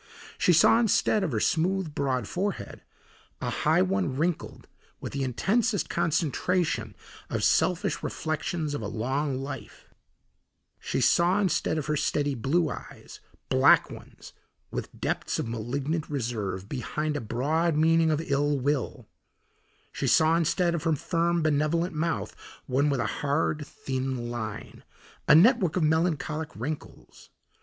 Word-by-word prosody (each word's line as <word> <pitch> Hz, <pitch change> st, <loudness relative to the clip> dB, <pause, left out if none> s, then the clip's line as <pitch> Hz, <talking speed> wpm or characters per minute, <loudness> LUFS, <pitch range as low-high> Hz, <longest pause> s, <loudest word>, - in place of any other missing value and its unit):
She -, -, +4 dB
saw 175 Hz, +7 st, +6 dB
instead 220 Hz, -2 st, +2 dB
of 170 Hz, -, -1 dB
her 110 Hz, -, 0 dB
smooth, 175 Hz, -, 0 dB
broad 130 Hz, -6 st, -1 dB
forehead, 195 Hz, +2 st, -4 dB, 0.6 s
a -, -, -3 dB
high -, -, +2 dB
one 95 Hz, +6 st, -1 dB
wrinkled 165 Hz, +2 st, -2 dB, 0.3 s
with -, -, -7 dB
the 140 Hz, -, -2 dB
intensest 200 Hz, -, 0 dB
concentration 165 Hz, -, 0 dB, 0.3 s
of -, -, -2 dB
selfish 185 Hz, +3 st, +2 dB
reflections 155 Hz, -1 st, -3 dB
of 145 Hz, -, -3 dB
a 105 Hz, -, -3 dB
long 130 Hz, +6 st, -2 dB
life; 135 Hz, +2 st, -8 dB, 0.9 s
she -, -, -2 dB
saw 175 Hz, +3 st, +3 dB
instead 185 Hz, -4 st, 0 dB
of 150 Hz, -, -2 dB
her 150 Hz, -, 0 dB
steady 145 Hz, 0 st, 0 dB
blue 145 Hz, +8 st, +1 dB
eyes, -, -, -10 dB, 0.3 s
black -, -, +5 dB
ones -, -, -12 dB, 0.4 s
with -, -, -4 dB
depths -, -, -2 dB
of -, -, -2 dB
malignant 135 Hz, +8 st, -3 dB
reserve, 110 Hz, -9 st, -3 dB
behind 150 Hz, +5 st, -3 dB
a 145 Hz, -, -2 dB
broad 150 Hz, +9 st, 0 dB
meaning 165 Hz, +1 st, +4 dB
of 155 Hz, +1 st, 0 dB
ill 145 Hz, 0 st, +1 dB
will; 140 Hz, -1 st, -2 dB, 0.8 s
she -, -, -3 dB
saw 160 Hz, +1 st, +4 dB
instead 170 Hz, +1 st, +1 dB
of 170 Hz, -, -2 dB
her 165 Hz, 0 st, +1 dB
firm, 170 Hz, +2 st, 0 dB
benevolent 155 Hz, +3 st, +1 dB
mouth 165 Hz, +2 st, -2 dB, 0.3 s
one 140 Hz, +2 st, +1 dB
with 140 Hz, -3 st, 0 dB
a -, -, -1 dB, 0.2 s
hard, 150 Hz, +1 st, 0 dB
thin 130 Hz, -2 st, -4 dB
line, 110 Hz, -3 st, -6 dB, 0.4 s
a -, -, +8 dB
network 190 Hz, -, +5 dB
of 180 Hz, -, +1 dB
melancholic 160 Hz, -1 st, 0 dB
wrinkles. 145 Hz, +8 st, -7 dB
150 Hz, 140 wpm, -27 LUFS, 135-170 Hz, 0.9 s, a